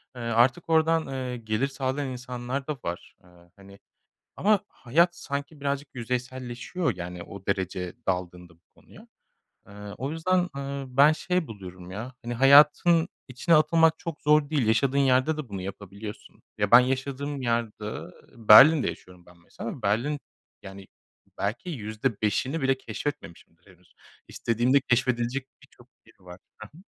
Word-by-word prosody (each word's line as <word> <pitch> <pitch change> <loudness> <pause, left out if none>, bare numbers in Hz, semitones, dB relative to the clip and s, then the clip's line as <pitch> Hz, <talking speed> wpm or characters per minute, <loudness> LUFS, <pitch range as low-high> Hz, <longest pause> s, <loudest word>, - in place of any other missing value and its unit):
eee, 120 - -8
artık 120 +5 +1
oradan, 160 0 +2
eee, 130 -2 -4
gelir 110 +3 -1
sağlayan 135 0 -3
insanlar 125 +1 -5
da 150 - -1
var. 85 +3 -6
Eee, 90 - -21 0.3
hani, 100 0 -16 0.6
ama 210 0 +3
hayat 170 +8 +1
sanki 145 -1 -6
birazcık 140 0 -2
yüzeyselleşiyor, 125 - -3
yani, 90 0 -7
o 100 +2 -11
derece 95 -2 -2
daldığında 90 -2 -4
bu 85 - -33
konuya. - - -18 0.6
Eee, - - -15 0.3
o 135 +3 -3
yüzden, 180 +2 +1
eee, 140 0 -4
ben 145 +3 +7
şey 180 +1 -1
buluyorum 95 -5 -10
ya 110 +7 -6
hani 120 +1 -4
hayatın 150 +6 +6 0.2
içine 130 +7 +1
atılmak 160 +1 +4
çok 170 -4 -7
zor 150 -1 +3
değil. 145 -7 +1
Yaşadığın 130 +5 +2
yerde 135 +3 +3
de 150 -5 -6
bunu 100 -2 -6
yapabiliyorsun. 100 +2 -9 0.2
Ya 105 -1 0
ben 120 - +10
yaşadığım 135 +2 -3
yerde 115 -3 -2 0.6
Berlin'de 140 +7 +9
yaşıyorum 90 -1 -10
ben 85 0 -19
mesela 85 - -9
ama 125 - -10
Berlin 120 +9 0 0.4
Yani 95 0 -11 0.5
belki 110 - -3
%5'ini 115 - -2
bile 135 0 +2
keşfetmemişimdir 85 - -7
henüz. 90 -1 -28 0.3
İstediğimde 120 +4 +1
keşfedilecek 125 +1 0 0.2
birçok - - -20 0.2
yeri - - -23
var. 90 0 -12 0.2
Ha 110 - -10
ha. - - -15
125 Hz, 145 wpm, -26 LUFS, 105-145 Hz, 0.6 s, ben